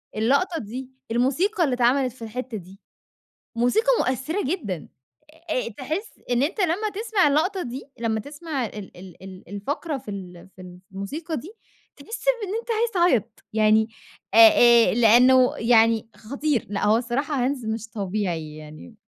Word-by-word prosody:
اللقطة 280 - +1
دي، 250 +4 -7 0.2
الموسيقى 310 - +1
اللي 270 - +1
اتعملِت 250 +1 +2
في 255 - -21
الحتّة 230 +1 -5
دي 190 +1 -13 0.8
موسيقى 245 - +2
مؤثرة 265 - -1
جدًا. 230 - -3 0.6
أ 255 - -1
تحس 315 - -5
إن 245 +1 +2
أنت 360 +8 -1
لمّا 370 +5 +1
تِسمَع 415 -6 +2
اللقطة 360 +7 +1
دي، 255 0 -6 0.2
لمّا 220 -1 0
تِسمَع 290 +1 -5
ال 210 -2 -10
ال 180 -1 -13
ال 190 -2 -11
الفقرة 280 - -4
في 220 - -9
ال 180 -3 -9
في 185 - -11
ال 180 0 -12
في - - -22
الموسيقى 310 - -5
دي 320 - -8 0.4
تحس 455 +2 -8 0.2
بإن 400 0 -3
أنت 470 - -10
عايز 455 +1 +1
تعيط 245 - +1
يعني، 220 0 +3 0.5
آآ، 230 +1 +7
لأنه 250 +3 +5
يعني 225 -1 +3
خطير. 275 +2 -2
لأ 205 - -2
هو 220 +2 +4
صراحة 255 +2 -1
Hans 260 -5 -4
مش 225 0 -7
طبيعي 185 -7 -3
يعني. 155 +8 -12
245 Hz, 155 wpm, -24 LUFS, 215-300 Hz, 0.8 s, آآ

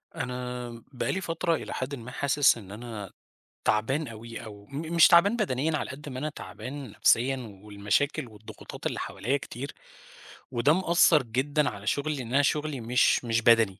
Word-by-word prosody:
أنا 125 -1 -4 0.2
بقى 130 - -2
لي 190 - -2
فترة 165 -1 0
إلى - - -6
حدٍ 135 +2 -3
ما 125 0 -9
حاسِس 140 -2 +3
إن 100 -4 -11
أنا 105 -3 -7 0.5
تعبان 130 +8 +1
اوي، 115 +1 -8
أو 105 -2 -11
م 155 +7 -5
مش 165 - +9
تعبان 190 +5 +6
بدنيًا 155 - 0
على - - -4
قد 145 +2 -9
ما 130 -1 -5
أنا 150 +3 -2
تعبان 140 -2 -8
نفسيًا 120 -3 +1
والمشاكل 105 +8 0
والضغوطات 110 -1 -11
اللي - - -1
حواليّا 130 +7 -1
كتير، 135 0 -7 0.8
وده 130 +4 +3
مأثّر 170 -4 +4
جدًا 140 +5 0
على 100 0 -9
شُغلي، 150 +5 0
لإن 125 -3 -6
أنا 140 - +5
شُغلي 150 -2 0
مش 120 +2 +3
مش 115 0 +1
بدني، 115 -4 +4
130 Hz, 170 wpm, -28 LUFS, 115-150 Hz, 0.8 s, مش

